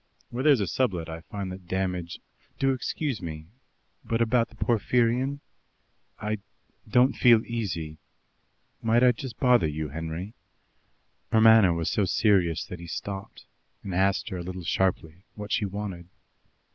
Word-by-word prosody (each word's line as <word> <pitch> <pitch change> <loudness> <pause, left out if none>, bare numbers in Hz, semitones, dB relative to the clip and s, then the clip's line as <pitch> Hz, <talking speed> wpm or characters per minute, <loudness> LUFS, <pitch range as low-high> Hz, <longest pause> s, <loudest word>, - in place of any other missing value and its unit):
"When 125 +4 -3
there 150 - +8
is 130 - +1
a - - +1
sublet 90 -6 -1
I 80 0 -6
find 95 +2 -6
that 90 -1 -10
damage 90 -2 -3 0.2
" - - -37
"Do 135 0 +3
excuse 130 0 -3
me, 80 -2 -6 0.6
but 115 - -1
about 115 0 +2
the - - -18
Porphyrion. 125 +4 +1 0.8
I 105 0 -2 0.5
don't 125 +4 +4
feel 115 -3 +5
easy 85 -9 -4 0.8
might 115 +2 +3
I 125 - +7
just 125 0 -7
bother 125 -10 +4
you, 75 0 -3
Henry?" 80 +7 -5 1.0
Her 110 - +4
manner 110 -4 +7
was 85 -1 -1
so 105 - +1
serious 95 -4 +2
that 90 - -8
he 85 - -9
stopped, 95 +4 -6 0.4
and 95 - -5
asked 95 +3 +1
her 95 - -4
a - - -4
little 90 0 -6
sharply 90 0 -1
what 105 -1 -7
she 105 - +1
wanted. 95 -3 -5
100 Hz, 160 wpm, -27 LUFS, 85-115 Hz, 1.0 s, there